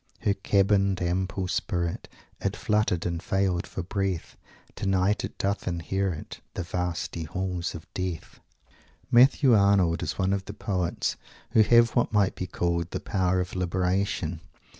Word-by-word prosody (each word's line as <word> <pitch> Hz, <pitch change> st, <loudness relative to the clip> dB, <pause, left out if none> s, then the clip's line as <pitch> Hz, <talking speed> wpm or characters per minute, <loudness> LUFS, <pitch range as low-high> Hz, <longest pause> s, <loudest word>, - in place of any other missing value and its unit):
Her 105 Hz, -3 st, +2 dB
cabined 100 Hz, -1 st, +2 dB
ample 95 Hz, +2 st, -1 dB
spirit 85 Hz, -2 st, -2 dB, 0.3 s
It -, -, -1 dB
fluttered 105 Hz, -5 st, +1 dB
and 85 Hz, -1 st, -2 dB
failed 95 Hz, -2 st, 0 dB
for 95 Hz, -, -5 dB
breath. 95 Hz, -2 st, -2 dB, 0.4 s
Tonight 95 Hz, +1 st, +1 dB
it -, -, -6 dB
doth 100 Hz, +1 st, -1 dB
inherit 90 Hz, 0 st, -2 dB, 0.2 s
The 90 Hz, -, -2 dB
vasty 85 Hz, -1 st, -3 dB
halls 90 Hz, +1 st, -3 dB
of 80 Hz, 0 st, -8 dB
death." 90 Hz, -4 st, -4 dB, 0.7 s
Matthew 130 Hz, +1 st, +6 dB
Arnold 100 Hz, -5 st, +4 dB
is -, -, -3 dB
one 95 Hz, 0 st, +1 dB
of 100 Hz, -1 st, -2 dB
the -, -, -8 dB
poets 95 Hz, -4 st, -1 dB, 0.3 s
who 110 Hz, -, +5 dB
have 115 Hz, +1 st, +5 dB
what 120 Hz, -, +1 dB
might 105 Hz, -3 st, +3 dB
be 90 Hz, -, -5 dB
called 85 Hz, -1 st, -1 dB
"the -, -, -3 dB
power 95 Hz, -3 st, 0 dB
of 90 Hz, 0 st, -3 dB
Liberation." 90 Hz, -2 st, -1 dB
95 Hz, 145 wpm, -27 LUFS, 90-100 Hz, 0.7 s, Matthew